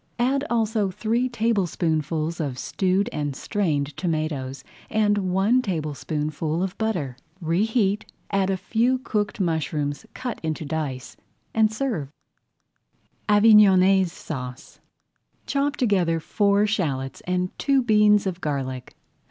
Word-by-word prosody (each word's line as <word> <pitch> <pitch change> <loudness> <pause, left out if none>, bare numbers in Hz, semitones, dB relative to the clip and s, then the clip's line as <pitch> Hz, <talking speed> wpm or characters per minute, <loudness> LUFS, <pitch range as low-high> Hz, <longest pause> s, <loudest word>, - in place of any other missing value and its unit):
Add 265 +3 +1
also 220 -3 +1
three 230 +6 0
tablespoonfuls 170 - 0
of 140 -5 -2
stewed 190 - 0
and 145 -2 -2
strained 150 -7 -1
tomatoes, 155 -5 -2 0.3
and 215 -1 +2
one 195 +6 +2
tablespoonful 155 - -2
of 190 -1 -3
butter. 175 - -2 0.2
Reheat, 200 +4 0 0.2
add 195 -1 +1
a 190 - +1
few 235 +7 +1
cooked 215 -6 -2
mushrooms 155 -5 -1
cut 250 -3 -4
into 155 -1 -3
dice, 145 -4 -4 0.4
and 220 -1 +3
serve. 220 - -2 1.2
[Page 210 0 +4
16] 220 -2 +9
AVIGNONNAISE 190 -2 +5
SAUCE 125 -8 -7 0.7
Chop 285 +1 0
together 185 - +1
four 200 +4 +2
shallots 140 -11 -2
and 180 0 -1
two 275 -2 +2
beans 210 -2 +4
of 185 -2 -3
garlic. 130 -4 -4
185 Hz, 120 wpm, -24 LUFS, 155-215 Hz, 1.2 s, 16